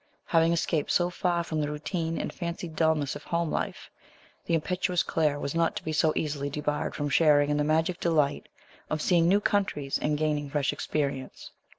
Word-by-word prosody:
Having 165 0 +3
escaped 160 -2 0
so 175 0 +2
far 175 -1 0
from 160 -2 -2
the 145 - -1
routine 165 +2 -3
and - - -4
fancied 170 -1 -5
dulness 160 -4 +1
of - - -8
home 170 -1 -1
life, - - -3 0.6
the 170 - +2
impetuous 180 +2 0
Claire 150 -3 0
was 140 - -3
not 165 0 +1
to - - -5
be 155 - -3
so 155 +1 +3
easily 145 -2 -2
debarred 150 +1 -2
from 145 - -2
sharing 145 0 +4
in 145 - +1
the 150 - +2
magic 160 +4 +1
delight 150 -4 +1 0.4
of 155 - -1
seeing 170 +1 +3
new 195 +3 +4
countries 190 -10 0
and 150 0 0
gaining 150 -1 -1
fresh 145 -1 0
experience. 140 -3 -3
155 Hz, 190 wpm, -28 LUFS, 150-170 Hz, 0.6 s, sharing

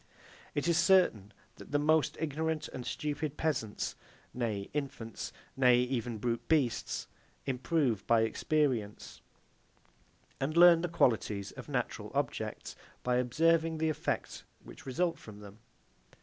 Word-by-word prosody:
It 145 +2 0
is 170 0 +3
certain 170 - +4 0.3
that - - -12
the 145 - +3
most 155 +1 +2
ignorant 160 0 -2
and 125 - -7
stupid 150 0 -3
peasants 130 -10 -2 0.4
nay 110 -5 -2
infants, 135 -7 -4 0.2
nay 125 -2 +5
even 125 -2 -2
brute 115 +2 -2
beasts 140 -8 +1 0.4
improve 130 - 0
by 115 -1 +5
experience, 115 -2 -1 1.2
and 150 +5 -1
learn 170 -1 +8
the 175 - -2
qualities 110 -10 +1
of - - -10
natural - - -3
objects, - - -3 0.3
by 125 0 +2
observing 160 +6 +2
the 160 0 +1
effects 155 - -3 0.2
which - - -13
result 170 +6 0
from 105 -2 -11
them. 105 +1 -12
135 Hz, 125 wpm, -32 LUFS, 115-160 Hz, 1.2 s, learn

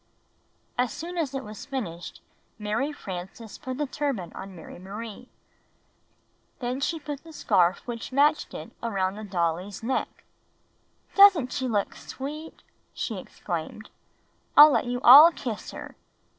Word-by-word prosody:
As 250 -1 +2
soon 340 +4 -6
as 280 -5 -2
it 270 - -3
was 210 -1 -9
finished, 195 -12 -6 0.4
Mary 220 +7 -1
Frances 195 -3 -8
put 255 0 -5
the 295 - 0
turban 265 - -3
on 190 -1 -9
Mary 165 +1 -11
Marie. 215 +5 -8 1.3
Then 250 0 -3
she 325 +3 -1
put 290 -2 -7
the 325 - -12
scarf 180 - +2
which 235 0 -6
matched 290 +3 +2
it - - -8
around 195 -5 -1
the 215 - -8
dolly's 180 +1 -2
neck. 260 +3 -2 0.9
"Doesn't 390 -10 +6
she 260 - -2
look 210 -4 -1
sweet!" 300 +4 -8 0.3
she - - -3
exclaimed. - - -6 0.7
"I'll 300 +1 +11
let - - +1
you 245 0 -3
all 295 +7 +11
kiss 235 -9 -6
her." - - -9
245 Hz, 140 wpm, -26 LUFS, 200-290 Hz, 1.3 s, I'll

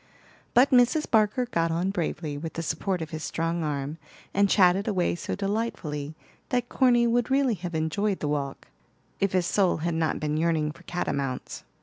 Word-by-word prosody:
But 255 +3 +6
Mrs. 250 +5 +4
Barker 220 +3 +3
got 165 -8 0
on 175 +4 0
bravely, 160 -4 -3
with 160 +3 -5
the 165 - -4
support 170 +2 -1
of 155 - -9
his 155 -1 -5
strong 165 +1 -2
arm, 145 +1 -3 0.3
and 200 0 +3
chatted 190 +1 +4
away 185 -5 +1
so 175 - -4
delightfully 190 -8 -3 0.3
that 245 -1 0
Corny 240 -2 +4
would 235 0 +1
really 270 -2 +3
have 175 -3 -5
enjoyed 190 +6 0
the 150 - -2
walk, 140 -2 -3 0.5
if 195 -1 +1
his 185 -2 +2
soul 190 0 +2
had 170 - 0
not 160 -1 0
been 150 0 -1
yearning 160 -2 +1
for - - -15
catamounts. 140 -7 -3
175 Hz, 180 wpm, -26 LUFS, 155-210 Hz, 0.5 s, But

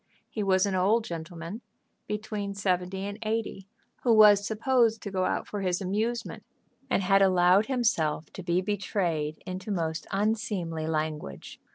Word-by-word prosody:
He 215 - -3
was 190 -1 +3
an 200 - -1
old 200 +5 +3
gentleman, 170 +4 -7 0.5
between 210 -1 -4
seventy 190 -1 -1
and 205 +1 -6
eighty, 215 -3 -3 0.3
who 245 - +2
was 210 -2 +7
supposed 230 0 +2
to 200 - -5
go 185 -1 0
out - - -1
for 205 - -4
his 180 -2 0
amusement, 215 +5 -2 0.5
and 195 - +1
had 195 +1 +4
allowed 185 +2 +4
himself 165 - 0
to - - -7
be 175 0 +1
betrayed 180 -6 -2
into 185 +2 -6
most 165 -5 -2
unseemly 195 -7 -1
language. 155 - -4
195 Hz, 150 wpm, -28 LUFS, 175-210 Hz, 0.5 s, was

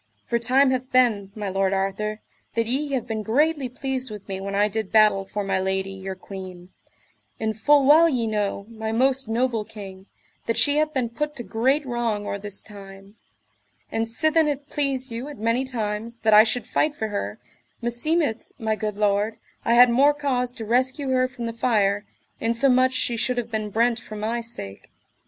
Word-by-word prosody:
For 235 - 0
time 260 +3 +3
hath 255 0 -2
been, 225 -6 +2
my 210 -2 -4
lord 195 0 0
Arthur, 195 +3 -2 0.3
that 230 0 +1
ye 275 +5 0
have 250 -3 -1
been 220 -2 -3
greatly 280 +5 +1
pleased 260 0 -3
with 210 -2 -9
me 190 -1 -5
when 200 0 -4
I 205 +1 +3
did 215 -1 -4
battle 210 -3 +4
for 205 +1 -4
my 190 -1 0
lady, 190 0 -1
your 190 0 -6
queen; 185 -2 -9 0.7
and 220 -1 -1
full 285 +5 +4
well 320 +4 +7
ye 250 -6 0
know, 205 -2 -2
my 220 -1 -5
most 265 +2 +2
noble 230 -1 0
king, 195 -2 -11 0.4
that 230 - 0
she 290 0 +5
hath 305 0 +2
been 255 -5 -1
put 295 +5 -3
to 240 - -5
great 265 +7 +1
wrong 235 -4 -2
or 200 - -3
this 205 -1 -5
time; 195 -1 -12 0.8
and 225 0 -1
sithen 315 +7 +2
it 285 0 -3
pleased 270 -3 -1
you 235 +4 -5
at 295 - -9
many 230 +4 +1
times 230 -2 -3
that 220 -1 +4
I 215 +1 +9
should 235 +2 -1
fight 305 -1 0
for 220 -5 -3
her, 105 - -4 0.4
meseemeth, 240 +2 -1
my 220 -1 -1
good 210 -1 -4
lord, 210 +1 +1 0.3
I 235 - +2
had 245 0 +7
more 280 +4 +4
cause 255 -4 -1
to 225 - -7
rescue 260 +4 0
her 255 0 +2
from 245 -2 -7
the 230 - -3
fire, 205 -4 +1 0.3
insomuch 255 +3 +3
she 240 -2 0
should 250 +2 0
have 235 -1 -3
been 215 -1 -2
brent 235 +3 +1
for 220 -2 -10
my 220 +3 -2
sake. 100 - -7
230 Hz, 190 wpm, -24 LUFS, 210-255 Hz, 0.8 s, I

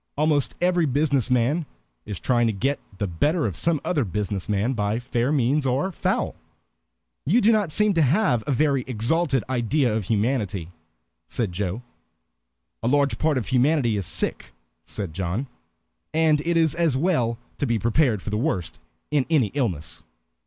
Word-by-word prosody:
Almost 150 -2 +1
every 175 -2 +2
businessman 140 +1 +1 0.4
is 105 -4 -5
trying 120 -2 +2
to 110 - 0
get 135 +8 -1 0.2
the 100 - -1
better 145 - 0
of 100 -7 -2
some 165 - +1
other 155 -6 +1
business 100 0 -3
man 105 +5 +1
by 105 -1 -1
fair 120 +1 -1
means 140 +1 +2
or 135 +9 0
foul." - - -1 0.9
"You 195 - +3
do 225 0 +4
not 210 -7 +1
seem 210 +4 +3
to 165 - +2
have 145 - +2
a - - +1
very 140 0 +2
exalted 135 - +1
idea 125 -1 +1
of 110 -3 -2
humanity," 105 -5 -1 0.6
said 115 -6 -2
Joe. 100 +5 -3 1.0
"A 115 - -2
large 140 +2 +2
part 155 -3 +2
of 110 -7 -3
humanity 130 -2 +2
is 100 -4 -2
sick," - - -1 0.3
said 95 -6 -5
John, 95 - -2 0.7
"and 160 -2 +3
it 170 0 +1
is 160 -3 +3
as 165 -6 +1
well 130 -8 +1 0.2
to 145 - 0
be 115 -1 +1
prepared 115 - +1
for 110 - -5
the 105 - 0
worst 95 - -2 0.3
in 145 -3 +1
any 140 -11 +2
illness." 95 - -2
130 Hz, 165 wpm, -24 LUFS, 110-155 Hz, 1.0 s, do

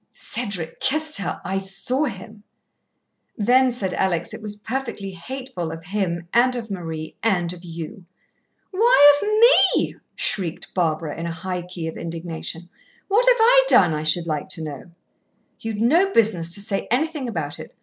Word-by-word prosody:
"Cedric 200 -9 -2
kissed 305 +3 +2
her 200 - -3
I 190 +1 -1
saw 245 +9 -2
him." 215 -2 -8 1.0
"Then," 250 +4 +4
said 195 -7 -2
Alex, 175 -2 -1
"it - - -8
was 210 -1 -6
perfectly 220 -2 -4
hateful 185 -3 -6
of 165 0 -8
him 175 -3 -2
and 250 +2 +4
of 225 -3 -6
Marie 165 -4 -6
and 180 -6 +1
of 175 0 -12
you." 170 +3 -8 0.7
"Why 370 -9 +6
of 415 - -1 0.5
me?" - - -1 0.2
shrieked 180 -3 -3
Barbara 160 -3 -1
in 170 - -3
a - - -3
high 180 +2 -4
key 175 -1 -7
of 160 - -6
indignation. 165 0 -6 0.4
"What 455 +5 +3
have - - +6
I - - +6
done, 160 - +5
I 150 - -2
should 155 +2 +2
like 155 +1 -3
to 170 -4 -3
know?" 150 +3 -8 0.7
"You'd 225 -2 -4
no 340 +12 +4
business 185 - +2
to 200 - -1
say 200 -1 -2
anything 285 +1 -1
about 155 -9 -4
it. - - -11
195 Hz, 165 wpm, -22 LUFS, 170-250 Hz, 1.0 s, Why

